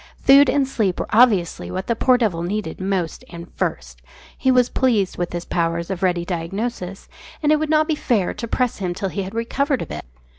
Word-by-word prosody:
Food 275 +1 +7
and 275 0 +2
sleep 210 -8 -1
were - - -1
obviously 210 -7 +3
what 185 +1 -4
the 235 - 0
poor 255 +2 +4
devil 205 -9 0
needed 185 -1 -3
most 185 -4 -2
and 170 0 -10
first - - -4 0.3
he 260 - 0
was 250 -1 +4
pleased 225 -9 +1
with 175 - -2
his 175 0 -4
powers 170 +1 -1
of 185 - -4
ready 175 -2 +1
diagnosis 190 +3 -4 0.4
and 300 - +3
it 305 - +4
would 310 0 -2
not 310 0 +3
be 320 - +1
fair 230 -10 0
to 230 - -6
press 250 +1 0
him 180 -3 -2
till 195 +1 -2
he 200 - -3
had 195 +3 -6
recovered 265 +4 0
a - - -6
bit. - - -7
200 Hz, 215 wpm, -21 LUFS, 175-250 Hz, 0.4 s, Food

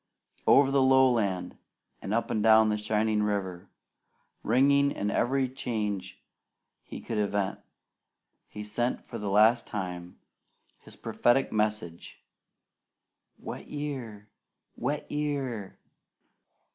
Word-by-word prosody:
Over 135 0 +6
the 135 -1 +3
lowland 125 -8 +2 0.4
and 95 - -5
up 115 +2 0
and 110 - 0
down 110 0 +6
the 105 - 0
shining 105 0 0
river, 95 -3 -3 0.7
ringing 140 +4 +3
in 105 -6 -2
every 130 +4 +1
change 105 -7 -4 0.6
he - - -9
could 110 -2 -4
invent, 100 -1 -1 0.9
he 105 - -8
sent 120 +4 -1
for 115 - -7
the 105 -1 -3
last 110 +4 +4
time 90 -4 -6 0.6
his - - -13
prophetic 130 +3 +1
message, 105 -6 -3 1.1
"Wet - - -8
year! 130 -8 -6 0.5
Wet 145 +5 -3
year!" 140 -9 -3
110 Hz, 105 wpm, -28 LUFS, 105-130 Hz, 1.1 s, Over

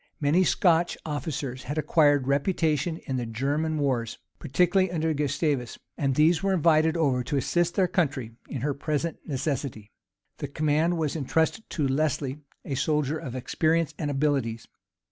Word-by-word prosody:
Many 155 +5 +3
Scotch 175 -2 +2
officers 140 -3 -4
had 145 +4 -4
acquired 145 -3 +3
reputation 155 +2 +1
in 130 - -2
the 120 - -2
German 145 +7 -1
wars, 125 -6 -1 0.2
particularly 180 +5 +2
under 160 -2 0
Gustavus; 145 -3 -1 0.2
and 135 -2 0
these 160 +3 +4
were 195 -1 +1
invited 160 -1 +3
over 135 -6 +1
to 145 - -2
assist 175 +5 0
their 190 -2 +3
country 140 -10 -1 0.2
in 130 - -4
her 145 +2 0
present 155 +3 -2
necessity. 135 -7 -3 0.5
The 145 - -4
command 155 +4 +1
was 155 -2 -1
intrusted 160 +8 0
to 150 -5 -1
Lesley, 140 0 -1 0.3
a 140 - -3
soldier 150 +2 0
of 130 -4 -7
experience 160 +5 0
and 150 - -1
abilities. 135 -6 -1
150 Hz, 150 wpm, -26 LUFS, 135-160 Hz, 0.5 s, these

